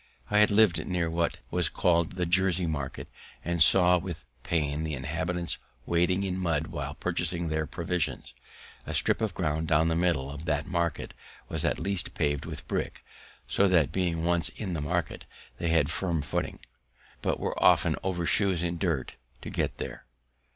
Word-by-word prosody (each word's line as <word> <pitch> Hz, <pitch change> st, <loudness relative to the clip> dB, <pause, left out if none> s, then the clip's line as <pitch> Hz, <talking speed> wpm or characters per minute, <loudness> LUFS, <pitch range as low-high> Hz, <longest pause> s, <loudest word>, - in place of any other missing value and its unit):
I 105 Hz, -, +5 dB
had 105 Hz, -, +6 dB
liv'd 105 Hz, -4 st, +4 dB
near 90 Hz, -3 st, 0 dB
what 85 Hz, 0 st, 0 dB
was 90 Hz, -4 st, +1 dB
call'd 85 Hz, -2 st, +2 dB
the 90 Hz, -1 st, -1 dB
Jersey 90 Hz, 0 st, +2 dB
Market, 70 Hz, -4 st, -4 dB, 0.4 s
and 85 Hz, -1 st, 0 dB
saw 90 Hz, +2 st, +6 dB
with 85 Hz, -6 st, -7 dB, 0.2 s
pain 75 Hz, -2 st, -1 dB
the 80 Hz, -2 st, -2 dB
inhabitants 80 Hz, +6 st, -2 dB, 0.3 s
wading 90 Hz, +3 st, +2 dB
in 95 Hz, -1 st, -2 dB
mud 80 Hz, -4 st, 0 dB
while -, -, -5 dB
purchasing 85 Hz, -1 st, -1 dB
their 80 Hz, 0 st, -1 dB
provisions. 85 Hz, 0 st, -2 dB, 0.5 s
A -, -, -3 dB
strip -, -, +4 dB
of 110 Hz, -2 st, -1 dB
ground 80 Hz, -2 st, -1 dB
down 80 Hz, +1 st, +3 dB
the 80 Hz, -, +1 dB
middle 80 Hz, -6 st, +1 dB
of 75 Hz, +3 st, -8 dB
that 75 Hz, -2 st, 0 dB
market 85 Hz, -3 st, -2 dB, 0.4 s
was -, -, -2 dB
at -, -, +1 dB
length 100 Hz, -4 st, -2 dB
pav'd 75 Hz, -1 st, 0 dB
with -, -, -7 dB
brick, -, -, -3 dB, 0.4 s
so 100 Hz, -, +3 dB
that, 85 Hz, -6 st, +3 dB
being 85 Hz, -3 st, -1 dB
once 85 Hz, -2 st, +3 dB
in 95 Hz, -5 st, -5 dB
the 80 Hz, -, -2 dB
market, 85 Hz, +1 st, -2 dB, 0.3 s
they 85 Hz, -, -1 dB
had 80 Hz, -4 st, +3 dB
firm 85 Hz, -5 st, -1 dB
footing, 70 Hz, -, -3 dB, 0.6 s
but -, -, -1 dB
were -, -, -2 dB
often -, -, +5 dB
over 90 Hz, -2 st, -2 dB
shoes 95 Hz, -2 st, +2 dB
in 85 Hz, 0 st, -2 dB
dirt 80 Hz, -9 st, -1 dB, 0.3 s
to -, -, -6 dB
get -, -, -1 dB
there. -, -, -6 dB
85 Hz, 175 wpm, -28 LUFS, 80-90 Hz, 0.6 s, had